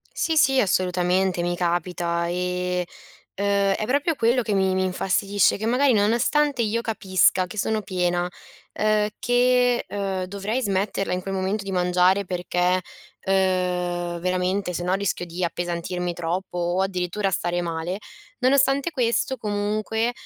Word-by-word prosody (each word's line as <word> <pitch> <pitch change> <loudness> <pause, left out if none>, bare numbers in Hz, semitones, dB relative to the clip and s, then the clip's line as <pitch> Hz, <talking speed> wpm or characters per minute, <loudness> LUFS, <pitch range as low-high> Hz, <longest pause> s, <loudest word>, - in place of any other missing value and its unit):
Sì 325 - 0
sì, 270 -2 +4
assolutamente, 180 -1 +1
mi 175 0 -1
capita. 175 -1 -1
E, 180 0 -1 0.5
ehm, 200 0 +2
è 215 - -2
proprio 285 +6 +1
quello 240 +1 +2
che 220 -3 -2
mi 190 -1 +2
mi 185 0 +1
infastidisce, 195 +1 +1
che 215 - -4
magari, 255 +2 +3
nonostante 240 +6 +2
io 230 +1 0
capisca 190 -4 +2
che 195 - -10
sono 215 +1 0
piena, 180 -2 -1 0.5
ehm, 215 0 +1
che, 245 0 +2
ehm, 195 -2 -3
dovrei 200 +6 -3
smetterla 195 -1 -1
in 180 - -2
quel 195 +1 -5
momento 190 +2 -1
di 195 - -5
mangiare 180 +2 +2
perché, 180 0 0 0.4
ehm, 180 -2 0
veramente, 185 +1 -1
se 175 - -3
no, 180 +1 0
rischio 195 -2 -2
di 175 +1 -5
appesantirmi 175 +1 -2
troppo 175 +2 -3
o 175 +2 0
addirittura 190 +1 -1
stare 175 0 -1
male, 170 +3 -3 0.4
nonostante 270 +3 +3
questo, 255 -1 0
comunque, 215 +2 -1
190 Hz, 140 wpm, -24 LUFS, 180-215 Hz, 0.5 s, sì